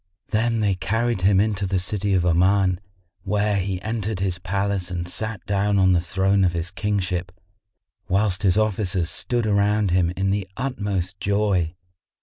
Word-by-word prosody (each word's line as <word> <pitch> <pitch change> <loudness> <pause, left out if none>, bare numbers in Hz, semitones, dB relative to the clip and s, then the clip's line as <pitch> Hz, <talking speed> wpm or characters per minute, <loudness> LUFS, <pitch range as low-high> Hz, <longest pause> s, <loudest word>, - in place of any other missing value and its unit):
Then 115 +1 +1
they 100 -2 +2
carried 110 +3 -1
him 95 +1 +4
into 100 -2 0
the 95 0 0
city 100 +1 0
of 90 -1 +2
Oman, 90 +1 +3 0.4
where 105 +2 0
he 95 -1 -2
entered 110 -2 -2
his 95 -3 -1
palace 95 +1 -1
and 85 -1 -4
sat 105 0 -4
down 100 0 +1
on 95 -1 +4
the 90 -2 +3
throne 95 +3 +1
of 90 -2 +2
his 85 +1 -3
kingship, 95 -3 -2 0.8
whilst 100 0 +1
his 95 -2 +3
officers 95 -5 0
stood 120 -2 -1
around 105 -1 +2
him 90 -1 +2
in 95 +1 +1
the 100 -1 -1
utmost 100 -8 -2
joy. 100 -5 0
100 Hz, 160 wpm, -23 LUFS, 90-105 Hz, 0.8 s, him